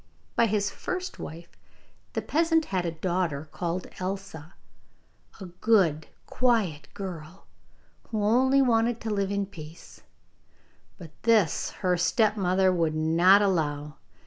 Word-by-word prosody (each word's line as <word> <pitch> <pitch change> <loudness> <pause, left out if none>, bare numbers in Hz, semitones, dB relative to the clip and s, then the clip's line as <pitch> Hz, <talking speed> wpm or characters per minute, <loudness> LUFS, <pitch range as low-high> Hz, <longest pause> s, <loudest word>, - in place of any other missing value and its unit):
By 235 - +4
his 205 -1 0
first 365 - -5
wife 170 +2 -9 0.6
the - - -2
peasant 325 0 +2
had 180 -2 0
a - - -1
daughter 165 -3 -2
called 175 +1 -3
Elsa, 185 -3 -6 0.8
a 195 - -7
good 175 -4 +1 0.2
quiet 205 - 0
girl, 180 -2 -8 0.6
who 215 -2 -2
only 260 +5 +4
wanted 230 -1 +2
to 220 - -3
live 200 -2 0
in 200 0 -1
peace, 165 -4 -12 1.0
but 165 -5 -11
this 220 -8 +2 0.2
her 180 -1 +3
stepmother 190 -1 +2
would 165 -3 0
not 170 +6 +5
allow. 150 -5 -1
190 Hz, 120 wpm, -27 LUFS, 165-220 Hz, 1.0 s, not